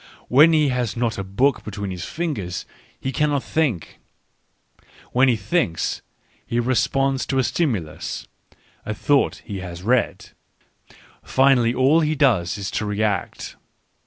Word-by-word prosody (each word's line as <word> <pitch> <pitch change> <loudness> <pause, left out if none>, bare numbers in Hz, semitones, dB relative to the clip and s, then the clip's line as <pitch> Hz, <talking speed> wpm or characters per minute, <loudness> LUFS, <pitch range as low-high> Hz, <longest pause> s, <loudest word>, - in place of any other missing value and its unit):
When 150 +6 +7
he 155 -3 +3
has 125 -3 -2
not 115 -3 -1
a - - -2
book 125 +8 +1
between 100 -2 -5
his 90 -1 -5
fingers 130 - -4 0.3
he 135 - -3
cannot 145 0 0
think. 140 - -1 1.1
When 130 +2 +4
he 125 - +4
thinks, 105 - -1 0.4
he 120 - -2
responds 135 +2 +1
to 135 - -1
a 130 - +3
stimulus 95 - -2 0.6
(a 110 - -4
thought 140 +5 +1
he 100 -3 -5
has 90 -1 -8
read), 120 +3 0 0.5
— - - -24 0.2
finally 130 -3 +3
all 135 +6 +4
he 155 -1 +1
does 110 - +2
is 100 -1 -4
to 105 - -2
react. 105 0 -2
120 Hz, 140 wpm, -22 LUFS, 100-135 Hz, 1.1 s, When